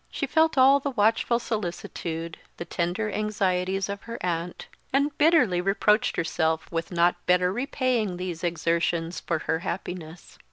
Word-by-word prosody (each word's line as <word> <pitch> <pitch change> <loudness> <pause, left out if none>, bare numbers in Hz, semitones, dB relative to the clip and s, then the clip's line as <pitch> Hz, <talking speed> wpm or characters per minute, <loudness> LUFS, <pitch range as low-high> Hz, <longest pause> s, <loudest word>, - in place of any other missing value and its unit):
She 280 - -3
felt 320 +2 +2
all 270 +2 +6
the 280 - -2
watchful 230 0 +2
solicitude, 170 -6 -4 0.2
the 170 - -5
tender 180 +6 -2
anxieties 195 -3 0
of 200 0 -5
her 230 - -4
aunt, 170 0 -3 0.3
and 280 +2 +1
bitterly 290 - +4
reproached 210 +3 +2
herself 160 -1 -1
with 165 +1 -3
not 175 0 +2
better 180 0 +3
repaying 245 -5 -1
these 180 -2 -5
exertions 170 0 0
for 170 - -1
her 160 - 0
happiness. 175 -2 -6
185 Hz, 145 wpm, -26 LUFS, 170-230 Hz, 0.3 s, all